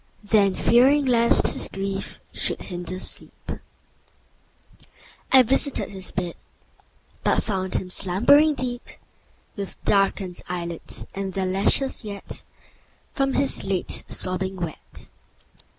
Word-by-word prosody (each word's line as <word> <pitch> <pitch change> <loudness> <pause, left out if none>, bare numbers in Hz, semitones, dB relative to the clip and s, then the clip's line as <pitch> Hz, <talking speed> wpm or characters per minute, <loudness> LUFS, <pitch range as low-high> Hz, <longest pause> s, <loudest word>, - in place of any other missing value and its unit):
Then, 205 -2 +3
fearing 270 +5 +4
lest 235 -2 +3
his - - -2
grief 195 0 -4
should - - 0
hinder 180 0 -6
sleep, - - -5 1.8
I 265 -1 +8
visited 270 0 +2
his 190 -2 -4
bed, 175 -1 -3 0.9
But - - +2
found 190 -3 -2
him 180 - -2
slumbering 245 +13 +4
deep, 245 -2 -3 0.7
With 200 -2 -6
darken'd 195 -2 +1
eyelids, 170 -2 -5
and 195 -1 -4
their 190 0 -1
lashes 200 +9 +1
yet 200 -2 -8
10 - - -5 0.7
From 275 -1 0
his 275 0 +1
late 190 -2 -1
sobbing 185 +1 +1
wet. 170 -4 -7
195 Hz, 115 wpm, -24 LUFS, 185-245 Hz, 1.8 s, I